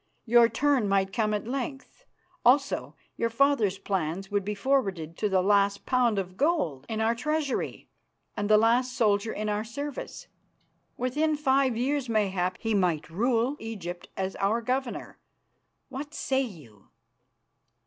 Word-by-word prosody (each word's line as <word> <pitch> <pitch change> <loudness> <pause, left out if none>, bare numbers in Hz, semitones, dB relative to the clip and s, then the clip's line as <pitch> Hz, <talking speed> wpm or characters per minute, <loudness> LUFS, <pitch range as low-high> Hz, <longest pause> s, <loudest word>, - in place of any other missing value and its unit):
Your 235 0 +6
turn 275 -7 +1
might 195 -1 +1
come 215 -2 +1
at 210 0 -2
length. 270 +1 -5 0.4
Also 275 +3 +2 0.2
your 230 - 0
father's 230 -5 +2
plans 195 0 -3
would 205 -1 +1
be 210 +2 -3
forwarded 195 - 0
to 210 - 0
the 190 -1 +2
last 200 0 +2
pound 245 -4 +2
of 185 -1 -4
gold 260 - 0
in 220 - -2
our 220 +1 +2
treasury 300 +3 -2 0.5
and 205 0 -2
the 215 - +7
last 240 +3 +2
soldier 215 -1 +2
in 215 +1 -3
our 210 0 -1
service. 280 +5 -6 0.7
Within 300 +5 0
five 270 -4 +2
years, 265 +1 -1
mayhap, 190 -4 0
he 225 -1 -1
might 175 -6 0
rule 235 - +1
Egypt 180 -6 -6
as 190 0 -2
our 205 +4 +1
Governor. 255 +1 -3 0.7
What 285 +3 -7
say 265 0 0
you?" 145 - -9
225 Hz, 145 wpm, -27 LUFS, 195-260 Hz, 0.7 s, the